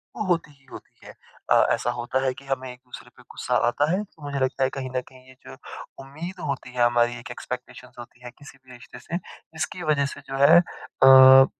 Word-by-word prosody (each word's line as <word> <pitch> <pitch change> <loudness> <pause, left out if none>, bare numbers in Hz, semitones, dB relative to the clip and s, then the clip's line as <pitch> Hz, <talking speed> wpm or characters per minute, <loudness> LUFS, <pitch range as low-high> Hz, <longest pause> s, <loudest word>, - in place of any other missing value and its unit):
वो 215 - -3
होती 170 -4 -1
ही 140 -2 -26
होती - - -14
है। - - -11 0.4
अ, - - +6
ऐसा 120 - 0
होता 120 +2 -3
है 130 - 0
कि 140 0 -15
हमें 130 -1 -4
एक-दूसरे 125 0 -13
पे - - -17
गुस्सा - - -3
आता 145 +6 0
है। 190 +4 0
तो 160 -7 -19
मुझे 140 -1 -4
लगता 130 0 -1
है 130 - +2
कहीं 130 -1 -5
न 130 - 0
कहीं 130 -1 -19
ये 130 - -17
जो - - -10 0.5
उम्मीद 165 +7 -9
होती 130 -2 -5
है 120 -1 +1
हमारी 120 0 +2
एक 120 - -10
एक्सपेक्टेशन्स 125 0 -9
होती 120 +1 -13
है 125 - -8
किसी 145 -2 -14
भी 130 -1 -18
रिश्ते 120 - -13
से 170 - -5
जिसकी 175 0 -8
वज़ह 150 -2 +1
से 145 - -12
जो 135 - -4
है 145 +5 +7
अ, 135 -5 +6
135 Hz, 220 wpm, -24 LUFS, 125-145 Hz, 0.5 s, है